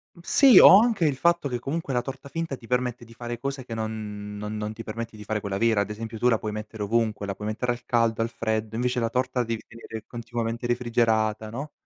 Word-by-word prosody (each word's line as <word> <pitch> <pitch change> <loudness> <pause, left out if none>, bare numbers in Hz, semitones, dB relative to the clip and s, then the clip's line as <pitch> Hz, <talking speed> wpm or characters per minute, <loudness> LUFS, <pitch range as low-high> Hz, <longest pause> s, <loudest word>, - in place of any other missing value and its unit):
Mh, - - -16
sì, 260 +1 +7
o 190 - +10
anche 220 -7 +2
il 145 -3 +2
fatto 170 +2 +2
che 125 -3 -3
comunque 140 +2 -3
la 125 - +2
torta 135 +2 -8
finta 165 -2 -4
ti 115 - -15
permette 125 -1 -1
di 115 - -15
fare 120 0 -6
cose 135 0 -4
che 120 - -8
non 105 -2 -5
non 105 +1 -5
non 105 0 -3
ti 115 +1 -8
permette 115 +1 -6
di 105 - -10
fare 105 +1 -2
quella 100 -1 -3
vera. 110 -1 +3
Ad 100 - -3
esempio 110 +1 -6
tu 120 - +2
la 115 -2 +4
puoi 105 0 -4
mettere 105 0 -6
ovunque: 110 -1 0
la 100 - -3
puoi 105 - -6
mettere 115 +3 -1
al 120 0 -6
caldo, 115 -2 +1
al 115 - 0
freddo, 110 -1 -2
invece 125 +1 0
la 115 -1 0
torta 130 +1 -1
la 120 - +1
devi 115 -1 -3
tenere 115 -1 -9
continuamente 120 0 -4
refrigerata, 115 -3 +1
no; 140 +7 -6
115 Hz, 250 wpm, -26 LUFS, 110-125 Hz, -, o